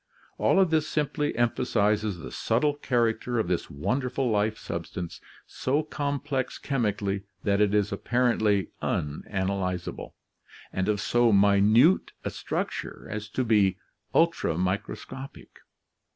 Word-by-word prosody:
All - - +4
of 185 -4 +4
this 155 -1 +2
simply 150 -1 0
empha 120 +1 +1
sizes 105 -3 +1
the 85 - -8
subtle 135 +6 +1
character 120 -3 0
of 110 - +1
this 90 -1 -1
wonderful 125 - -1
life 105 +1 +1
substance, 85 +1 -6 0.2
so 145 +4 -1
com 145 -2 -2
plex 135 -3 -3
chemically 105 -7 -1 0.2
that 100 0 +2
it 105 0 +3
is 105 -1 +2
apparently 110 -3 +1
unanalyzable, 90 +4 -2 0.6
and 95 +2 0
of 105 -1 +1
so 120 +2 +3
minute 105 - +5
a - - -3
structure - - -4
as 105 0 -5
to 130 - -1
be 105 -5 +3 0.4
ultramicroscopic. 105 - -1
110 Hz, 125 wpm, -27 LUFS, 100-130 Hz, 0.6 s, minute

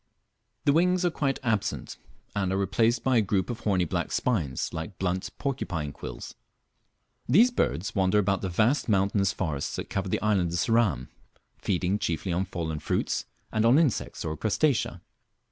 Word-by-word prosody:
The 140 - +5
wings 180 +3 +3
are 175 - +2
quite 140 -4 0
absent, 110 -4 -1 0.4
and 95 -2 0
are 95 - 0
replaced 110 +5 +1
by 130 -2 +3
a - - +5
group 100 +2 0
of 120 - -6
horny 95 -4 +1
black - - -2
spines 80 - -1
like 80 +4 -5
blunt 90 0 -1
porcupine 90 - -3
quills. - - -8 1.0
These 225 - +6
birds 105 - -1
wander 95 +1 +2
about 100 -1 +2
the 95 - -2
vast 115 +10 +2
mountainous 100 -1 +2
forests 80 -8 -3
that - - -6
cover - - -2
the - - 0
island 95 -6 +2
of - - 0
Ceram, 100 - +1 0.5
feeding 95 +1 0
chiefly 85 +1 -2
on 90 +3 0
fallen 80 -4 -4
fruits, - - -1 0.3
and 110 - +1
on 120 +4 +6
insects 155 -8 0
or 80 -1 -2
crustacea. 115 - 0
100 Hz, 165 wpm, -27 LUFS, 90-120 Hz, 1.0 s, These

